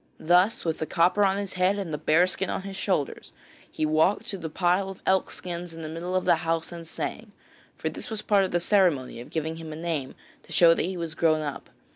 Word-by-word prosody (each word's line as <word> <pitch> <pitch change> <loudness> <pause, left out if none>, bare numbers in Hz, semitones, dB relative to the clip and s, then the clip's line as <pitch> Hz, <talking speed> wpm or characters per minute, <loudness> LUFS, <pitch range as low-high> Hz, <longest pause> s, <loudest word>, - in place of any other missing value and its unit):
Thus 180 +6 +3
with 165 -1 -1
the 160 - -2
copper 180 +5 +3
on 195 0 +3
his 200 -2 -3
head 185 +2 +2
and 185 -6 -4
the - - -1
bear 160 +3 +4
skin 185 +1 -2
on - - -2
his 195 0 -7
shoulders 190 -7 -2 0.4
he 155 - -2
walked 155 +6 +2
to 195 - -4
the 160 -2 -5
pile 180 +4 +1
of 195 - -9
elk 190 -1 +2
skins 175 -1 -6
in 165 - -8
the - - -4
middle 170 +3 -4
of 185 - +1
the - - +5
house 165 0 -1
and 170 -1 -8
sang, - - -5 0.4
for - - -3
this - - -4
was 220 -2 -4
part 200 -2 +3
of 190 - -1
the 175 - +1
ceremony 175 - +2
of 120 - -11
giving 160 0 -3
him 160 -1 -8
a - - -6
name 160 -5 -3 0.3
to - - -19
show 170 -1 +6
that 165 - -1
he 185 -1 -4
was 165 -2 -4
grown 160 -1 +2
up. 145 -2 -5
170 Hz, 245 wpm, -26 LUFS, 160-190 Hz, 0.4 s, show